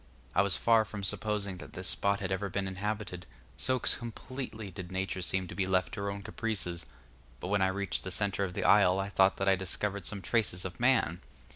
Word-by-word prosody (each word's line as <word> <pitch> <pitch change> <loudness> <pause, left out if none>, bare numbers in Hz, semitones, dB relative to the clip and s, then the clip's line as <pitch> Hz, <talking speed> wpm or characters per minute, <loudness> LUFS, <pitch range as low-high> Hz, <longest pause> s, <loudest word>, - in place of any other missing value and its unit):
I 95 - +5
was 100 -1 +3
far 115 -1 +5
from 100 -1 -7
supposing 100 -1 -1
that - - -11
this 95 -1 -2
spot 100 +3 +1
had 95 -1 -2
ever 95 +1 -1
been 95 +1 -2
inhabited, 95 -2 -4 0.3
so 130 0 +1
completely 120 -3 -3
did 90 0 -8
Nature 95 0 -2
seem 95 +1 0
to - - -7
be 95 -2 -1
left 95 -1 +1
to - - -4
her 100 - -1
own 100 0 -5
caprices; 105 -6 -2 0.5
but 90 - -5
when 100 -1 +2
I 95 - +5
reached 95 -2 -2
the 95 - -3
centre 100 +1 0
of 90 -1 -3
the 100 - -1
isle 95 -2 +5
I 95 +1 -2
thought 95 -1 +4
that 95 - -1
I 95 - +6
discovered 100 +2 -2
some 100 -2 -3
traces 100 -6 +1
of 95 - -6
man. 120 -9 +3
100 Hz, 220 wpm, -31 LUFS, 95-105 Hz, 0.5 s, I